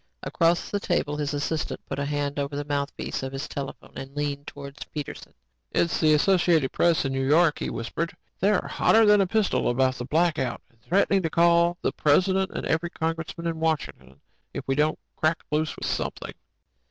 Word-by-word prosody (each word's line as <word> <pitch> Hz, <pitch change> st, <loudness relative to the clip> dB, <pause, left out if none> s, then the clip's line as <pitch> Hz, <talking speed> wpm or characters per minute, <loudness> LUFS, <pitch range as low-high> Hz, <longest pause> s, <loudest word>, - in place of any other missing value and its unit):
Across 170 Hz, +1 st, +1 dB
the 205 Hz, -, 0 dB
table, 145 Hz, -6 st, -1 dB
his 145 Hz, -1 st, -2 dB
assistant 150 Hz, +2 st, -2 dB
put -, -, -5 dB
a 140 Hz, -, -1 dB
hand 145 Hz, 0 st, -2 dB
over 140 Hz, 0 st, -3 dB
the 145 Hz, 0 st, -3 dB
mouthpiece 140 Hz, -1 st, -3 dB
of 135 Hz, 0 st, -5 dB
his 135 Hz, +1 st, -4 dB
telephone 140 Hz, -1 st, -7 dB
and 135 Hz, +1 st, -8 dB
leaned 145 Hz, -1 st, -3 dB
towards 140 Hz, 0 st, -8 dB
Peterson. 150 Hz, -3 st, -7 dB, 0.4 s
"It's 170 Hz, -, +1 dB
the 155 Hz, -1 st, +5 dB
Associated 165 Hz, -4 st, +3 dB
Press 170 Hz, -4 st, +2 dB
in 135 Hz, -, -1 dB
New 135 Hz, 0 st, -1 dB
York," 155 Hz, +3 st, +4 dB
he -, -, -2 dB
whispered. 165 Hz, +8 st, -3 dB, 0.3 s
"They're 205 Hz, +2 st, +2 dB
hotter 225 Hz, 0 st, +4 dB
than 210 Hz, -1 st, +6 dB
a 190 Hz, -, +2 dB
pistol 215 Hz, +1 st, +1 dB
about 130 Hz, +1 st, +1 dB
the 120 Hz, -, -4 dB
blackout 155 Hz, -3 st, 0 dB
and 115 Hz, -1 st, -33 dB
threatening 195 Hz, -, +2 dB
to 165 Hz, -, -1 dB
call 170 Hz, +1 st, +4 dB
the -, -, +1 dB
President 190 Hz, +6 st, +2 dB
and -, -, -5 dB
every 165 Hz, +2 st, 0 dB
congressman 165 Hz, 0 st, -4 dB
in 165 Hz, -1 st, -2 dB
Washington 135 Hz, -, -2 dB, 0.4 s
if -, -, -5 dB
we 135 Hz, -, +2 dB
don't 150 Hz, +3 st, +1 dB, 0.2 s
crack 155 Hz, +1 st, +1 dB
loose 155 Hz, 0 st, 0 dB
with -, -, -6 dB
something." -, -, -3 dB
155 Hz, 190 wpm, -26 LUFS, 140-170 Hz, 0.4 s, than